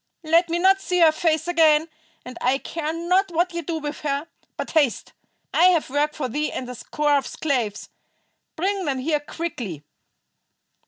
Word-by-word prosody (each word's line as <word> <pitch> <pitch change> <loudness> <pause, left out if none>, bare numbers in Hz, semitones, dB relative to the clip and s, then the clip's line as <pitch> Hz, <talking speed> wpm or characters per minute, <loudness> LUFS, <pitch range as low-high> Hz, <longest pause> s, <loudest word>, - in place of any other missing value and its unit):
Let 335 +2 +3
me 335 - 0
not 385 +2 +4
see 360 -2 -1
her 320 -1 +7
face 315 0 0
again, 320 -2 +4 0.4
and 250 0 -8
I 260 +2 +2
care 310 +2 -4
not 360 +4 +1
what 350 +1 0
ye 340 - -3
do 330 +1 -3
with 295 -1 -5
her. 285 0 -2 0.3
But - - -4
haste. 285 - +1 0.4
I 345 - +5
have 345 -7 +3
work 295 +2 0
for 280 -4 -2
thee 295 +5 -2
and 255 - -5
a 250 - -6
score 295 +4 0
of 270 - -7
slaves. 245 -9 -2 0.7
Bring 385 +2 -1
them 275 -2 -1
here 300 +3 0
quickly!" 255 - -6
315 Hz, 175 wpm, -23 LUFS, 280-340 Hz, 0.7 s, her